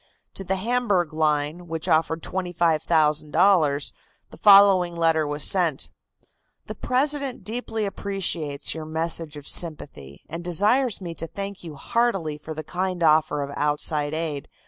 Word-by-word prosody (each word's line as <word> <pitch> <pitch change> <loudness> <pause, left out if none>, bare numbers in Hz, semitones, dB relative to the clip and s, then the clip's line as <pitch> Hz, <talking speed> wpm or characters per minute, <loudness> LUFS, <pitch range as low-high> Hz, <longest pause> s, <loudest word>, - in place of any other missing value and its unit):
To 195 - -2
the 190 +1 -1
Hamburg 200 -6 0
Line 155 +2 -1
which 160 -1 -4
offered 160 +1 +1
$25,000, 160 -2 +1 0.4
the - - -11
following 195 -4 +6
letter 165 -2 +2
was 145 0 -1
sent: 170 -8 +2 0.7
"The - - -6
President 275 0 -1
deeply 225 -1 -3
appreciates 175 -8 -3
your 160 -1 -7
message 160 -1 -3
of 145 - -10
sympathy, 75 - -4
and 165 +2 -7
desires 205 +7 +2
me 170 -2 -6
to 165 0 -6
thank 200 +2 -7
you 160 -3 -8
heartily 190 -4 -1
for 155 +1 -8
the 155 - -5
kind 180 +2 -3
offer 155 -2 +3
of 140 - -6
outside 150 +1 0
aid. 155 -4 -4
165 Hz, 140 wpm, -24 LUFS, 155-195 Hz, 0.7 s, following